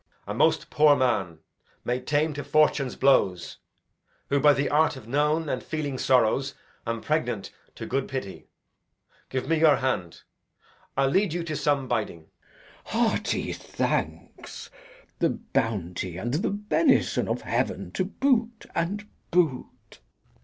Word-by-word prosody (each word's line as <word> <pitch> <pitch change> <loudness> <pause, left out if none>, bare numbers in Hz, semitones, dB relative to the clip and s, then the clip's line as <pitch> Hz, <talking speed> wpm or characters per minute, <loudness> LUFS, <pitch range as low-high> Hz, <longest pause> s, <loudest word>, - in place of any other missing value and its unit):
Edg. - - -4
A - - -1
most - - +2
poor 150 -1 +5
man, 100 - 0 0.4
made 125 +1 -2
tame 150 +1 +1
to 145 0 -5
fortune's 145 -2 +2
blows, 95 -10 +2 0.7
Who, 140 - +2
by 150 +1 +6
the 140 0 0
art 150 0 +3
of 125 -4 -11
known 150 +5 +1
and 130 -3 -2
feeling 145 -4 -4
sorrows, 130 +2 +2 0.3
Am 115 -1 -2
pregnant - - -1 0.2
to - - -6
good 135 +1 -1
pity. 130 -8 -6 0.8
Give 130 -1 -3
me 165 -1 +2
your 155 -2 +6
hand; 90 -10 -2 0.7
I'll 135 0 +3
lead 190 +2 +2
you 175 0 -2
to 155 -2 -4
some 140 -3 0
biding. 95 -9 -2
Glou. - - -21
Hearty - - 0
thanks. - - -4 0.5
The - - +3
bounty 90 -5 -2
and 120 +6 -3
the 165 +9 0
benison 210 +10 +2
of - - -2
heaven - - -2
To - - -1
boot, 235 -4 0
and 200 +5 -2 0.2
boot! 155 - -1
140 Hz, 140 wpm, -26 LUFS, 125-160 Hz, 0.8 s, by